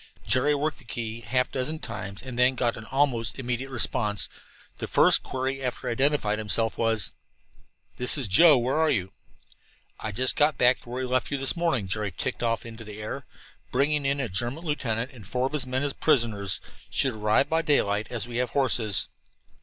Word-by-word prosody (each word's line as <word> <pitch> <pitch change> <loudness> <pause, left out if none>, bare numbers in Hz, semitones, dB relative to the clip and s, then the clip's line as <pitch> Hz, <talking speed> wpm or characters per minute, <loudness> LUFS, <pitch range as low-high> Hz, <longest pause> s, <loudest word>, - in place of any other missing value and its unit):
Jerry 145 +4 +2
worked 150 +1 -2
the - - -15
key 115 -1 -5
half 125 +3 0
a - - -28
dozen 140 +4 -1
times 110 -7 -6
and 125 -2 -6
then 125 +1 +5
got 120 -2 0
an 110 - -9
almost 130 -4 0
immediate 125 0 -3
response. 105 -4 0 0.5
The - - -4
first - - +5
query 130 +1 -3
after 125 -2 -4
he - - 0
had 115 - -4
identified 135 -7 +2
himself 110 +1 0
was: 115 -3 +1 0.8
"This 125 +4 +1
is 135 -6 0
Joe; 150 - +7
where 125 +5 0
are 160 -1 +3
you?" 95 -9 0 1.0
"Just 130 +6 +2
got 150 -2 +3
back 125 +1 +4
to - - -15
where 125 +2 -3
we - - -2
left 130 - +1
you 140 - -1
this 135 0 +1
morning," 165 - 0
Jerry 105 +1 -2
ticked 130 +8 -4
off 115 -1 0
into 115 0 -9
the 105 -1 -9
air. 105 - -6 0.4
"Bringing 140 +2 +2
in 140 +1 +1
a 130 - -1
German 120 - -3
lieutenant 125 -5 -1
and 110 -7 -12
four 125 +3 -1
of 135 - -3
his 140 -4 0
men 130 +2 -1
as 145 -1 -1
prisoners. 110 - +1 0.3
Should 135 -2 +1
arrive 110 +4 +2
by 160 +1 +1
daylight, 110 -9 +1
as 120 -2 -3
we 120 -1 -5
have 125 0 0
horses." 115 -8 +1
125 Hz, 200 wpm, -26 LUFS, 110-135 Hz, 1.0 s, Joe